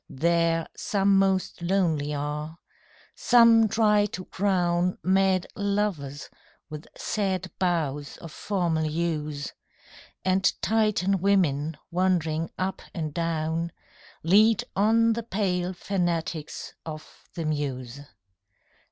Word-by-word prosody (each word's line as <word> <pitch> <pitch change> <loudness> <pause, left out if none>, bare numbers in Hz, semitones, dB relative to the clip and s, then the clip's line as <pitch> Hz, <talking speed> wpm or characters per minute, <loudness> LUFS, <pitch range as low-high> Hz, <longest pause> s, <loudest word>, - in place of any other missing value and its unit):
There 165 +2 +1
some 195 -1 +2
most 190 -2 0
lonely 170 -5 +1
are: 150 +2 -4 0.6
some 230 -2 +5
try 210 -1 +3
to 185 -3 -7
crown 180 -2 0
Mad 190 -1 +2
lovers 200 -9 -2 0.4
with 150 +1 -8
sad 190 -3 -2
boughs 150 -6 -1
of 165 - -10
formal 170 -4 -1
yews, 155 -3 -2 0.7
And 190 +1 +3
Titan 210 -3 +2
women 160 -6 +1
wandering 170 -3 0
up 190 +1 -2
and 155 -4 -3
down 165 0 -1 0.5
Lead 210 +5 +5
on 225 +3 +3
the 235 - -3
pale 185 -5 -1
fanatics 175 -4 -3
of 155 -1 -10
the 165 - -3
muse. 140 -4 -3
175 Hz, 100 wpm, -26 LUFS, 155-195 Hz, 0.7 s, some